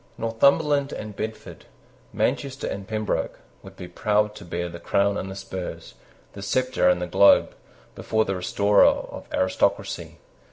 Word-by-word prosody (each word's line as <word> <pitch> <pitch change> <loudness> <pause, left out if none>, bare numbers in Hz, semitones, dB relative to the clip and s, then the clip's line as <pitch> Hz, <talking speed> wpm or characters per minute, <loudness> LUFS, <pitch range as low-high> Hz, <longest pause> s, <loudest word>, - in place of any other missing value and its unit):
Northumberland 140 +5 +2
and 105 -1 -7
Bedford, 110 +2 -7 0.5
Manchester 135 0 -1
and 100 0 -5
Pembroke, 110 0 -2 0.2
would - - -13
be 90 - -8
proud 105 +3 0
to 105 - -11
bear 85 0 -4
the 85 0 -9
crown 100 +3 +1
and 95 - -4
the 95 - -7
spurs, 95 -2 -7 0.4
the 100 - -9
sceptre 130 +1 +1
and 90 0 +2
the 90 - -2
globe, 100 +3 +5 0.4
before 110 0 0
the 95 - -2
restorer 100 +3 +3
of - - -2
aristocracy. 95 0 -1
100 Hz, 150 wpm, -24 LUFS, 95-110 Hz, 0.5 s, globe